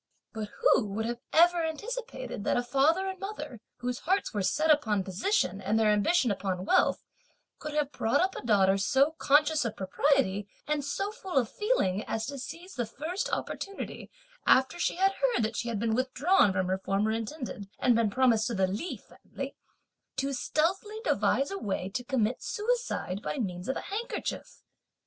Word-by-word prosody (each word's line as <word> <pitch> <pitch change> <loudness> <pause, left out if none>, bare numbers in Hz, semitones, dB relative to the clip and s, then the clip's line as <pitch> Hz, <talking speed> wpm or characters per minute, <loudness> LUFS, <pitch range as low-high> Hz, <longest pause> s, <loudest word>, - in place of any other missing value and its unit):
But 215 -2 -4
who 210 - +4
would 210 +3 -3
have 240 +1 -3
ever 345 +1 +5
anticipated 445 - -5
that - - +1
a 245 - +1
father 280 +9 +2
and 380 -1 -5
mother, 300 - -6 0.2
whose 245 0 -2
hearts 380 -3 0
were 205 - 0
set 310 +11 +2
upon 215 -10 +2
position 195 - 0
and 215 +2 +1
their 220 -1 +4
ambition 215 - +3
upon 190 -2 -2
wealth, - - +3 0.6
could 300 0 -6
have 295 -2 +1
brought 230 -4 +1
up 375 +2 +1
a - - -5
daughter 195 -4 +4
so 270 +9 +3
conscious 300 +1 +4
of 230 -4 -3
propriety 205 -1 +1 0.2
and 300 -1 0
so 390 +9 -2
full 380 -7 -5
of 240 -4 +2
feeling 220 - 0
as 220 0 -2
to 280 0 -6
seize 335 +8 -8
the 240 -4 -2
first 320 - -3
opportunity, 395 0 -5 0.4
after 265 +6 +4
she - - +1
had 385 +2 +3
heard 485 - +1
that 220 +2 -1
she 235 - -2
had 230 - -2
been 225 +2 0
withdrawn 260 - +3
from 185 0 0
her 185 +1 -1
former 200 +3 0
intended, 225 -3 -5
and 245 - +3
been 230 -2 +3
promised 230 -1 +3
to 235 - -2
the 190 -1 +3
Li 205 - -3
family, - - -9 0.6
to 275 +1 -1
stealthily 380 - -1
devise 280 - +1
a 395 - -3
way 190 -2 -2
to 245 +5 -3
commit 245 -2 0
suicide, 430 - -2
by 290 - -3
means 180 -5 -3
of 265 - 0
a - - -3
handkerchief. 445 +5 -5
260 Hz, 180 wpm, -29 LUFS, 210-335 Hz, 0.6 s, ever